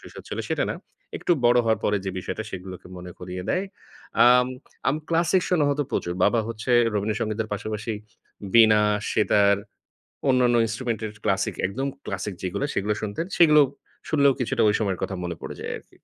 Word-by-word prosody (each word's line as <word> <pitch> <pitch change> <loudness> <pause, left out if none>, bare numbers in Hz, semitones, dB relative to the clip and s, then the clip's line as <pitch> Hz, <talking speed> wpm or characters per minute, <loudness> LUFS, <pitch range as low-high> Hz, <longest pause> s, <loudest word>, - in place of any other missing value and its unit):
শৈশব - - -11
ছিল - - -5
সেটা - - 0
না। - - -2 0.4
একটু - - +1
বড় 120 +1 +5
হওয়ার 110 -2 +2
পরে 105 - +2
যে 95 - -2
বিষয়টা, 110 +4 -4
সেগুলোকে 90 -1 -8
মনে 90 0 -8
করিয়ে 90 0 -6
দেয়। 185 - +1 0.6
আম 125 0 +6 0.4
আমি 140 +3 +1
ক্লাসিক 170 +2 +2
শোনা 165 -5 +2
হয়তো 145 0 0
প্রচুর। 85 - -1
বাবা 115 - +3
হচ্ছে 115 +2 -5 0.2
'রবীন্দ্র 105 +1 -1
সংগীতের' 110 0 -2
পাশাপাশি 110 +2 -3 0.6
বীণা, 110 -2 +7 0.3
সেতার 100 -1 +4 0.7
অন্যান্য 125 -2 +4
ইন্সট্রুমেন্টের 115 -1 -3
ক্লাসিক, 100 -1 0
একদম 135 +8 -3 0.2
ক্লাসিক 100 +1 -4
যেগুলো, 100 +9 -2
সেগুলো 105 +2 0
শুনতেন। 105 +10 -3
সেগুলো 150 -3 +7 0.5
শুনলেও 140 -3 +4
কিছুটা 125 - 0
ঐ - - +6
সময়ের 100 -4 -1
কথা 95 - -3
মনে 85 -1 -3
পড়ে - - -6
যায় - - -4
আরকি। - - -19
110 Hz, 170 wpm, -24 LUFS, 100-125 Hz, 0.7 s, বীণা